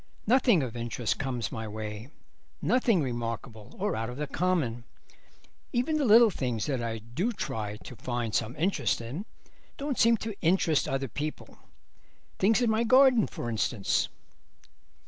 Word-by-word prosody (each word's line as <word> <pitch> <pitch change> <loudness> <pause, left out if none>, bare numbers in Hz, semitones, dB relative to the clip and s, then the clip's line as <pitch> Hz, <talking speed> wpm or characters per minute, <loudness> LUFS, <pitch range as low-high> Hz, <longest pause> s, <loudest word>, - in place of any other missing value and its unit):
Nothing 240 - +4
of 120 -2 -5
interest 120 -1 -2
comes 130 -4 -2
my 110 -1 -5
way, 110 +2 -6 0.5
nothing 230 - +2
remarkable 115 -3 -5
or 205 0 -1
out 115 +1 -3
of 125 - -7
the 150 - -2
common. 150 -8 -1 0.9
Even 260 +6 +1
the 290 - +1
little 225 0 +7
things 125 - -2
that 135 -4 -1
I 115 -1 -2
do 120 - -2
try 105 - -4
to 125 - -11
find 120 -1 -3
some 115 +4 -1
interest 175 +6 0
in 130 - -6 0.5
don't 280 -2 -3
seem 230 0 +5
to 220 0 -5
interest 165 -5 +2
other 135 0 -1
people. 150 +6 -6 0.8
Things 220 +5 +3
in 235 - +3
my 220 +1 +2
garden, 255 -1 +5
for - - -6
instance." 110 -2 0
135 Hz, 150 wpm, -28 LUFS, -, 0.9 s, little